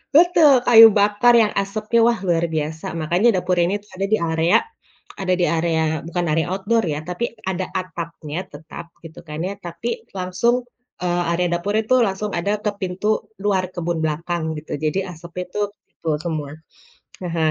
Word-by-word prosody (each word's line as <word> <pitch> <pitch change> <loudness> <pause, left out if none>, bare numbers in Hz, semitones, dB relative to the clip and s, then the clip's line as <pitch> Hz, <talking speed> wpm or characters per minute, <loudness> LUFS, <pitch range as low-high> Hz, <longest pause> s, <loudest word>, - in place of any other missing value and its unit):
betul, 315 -6 +6
kayu 225 -1 +10
bakar 210 +4 +4
yang 215 - +3
asapnya, 215 +3 0
wah 235 -1 +1
luar 170 -3 +1
biasa. 160 0 -3
Makanya 175 +8 +2
dapur 180 0 0
ini 185 +4 +1
tuh 205 - -25
ada 195 - 0
di 220 - +5
area 160 +2 +3 0.6
ada 185 -1 +1
di - - +4
area 160 -2 0
bukan 175 +1 -2
area 160 +1 +1
outdoor 225 +4 +1
ya, 150 0 -3
tapi 235 +6 -3
ada 185 0 -2
atapnya 170 -3 -6
tetap 155 +3 -10 0.2
gitu 165 -1 -11
kan 150 0 -6
ya, 200 - -3
tapi 170 +6 -6 0.3
langsung, 185 +7 +1 0.5
eee, 175 0 +1
area 175 +1 +1
dapurnya 205 +6 0
itu 255 - +4
langsung 195 +2 -3
ada 185 +4 0
ke 210 - +1
pintu 185 +3 -3 0.4
luar 195 -2 +2
kebun 170 -1 -2
belakang 165 +2 -2
gitu, 150 - -10
jadi 155 +4 0
asapnya 170 +2 -7
itu 210 - -4 0.2
ke - - -69
situ 165 - -6 0.2
semua. 155 -4 -3 0.7
Heeh. 165 -3 0
175 Hz, 170 wpm, -21 LUFS, 165-205 Hz, 0.7 s, kayu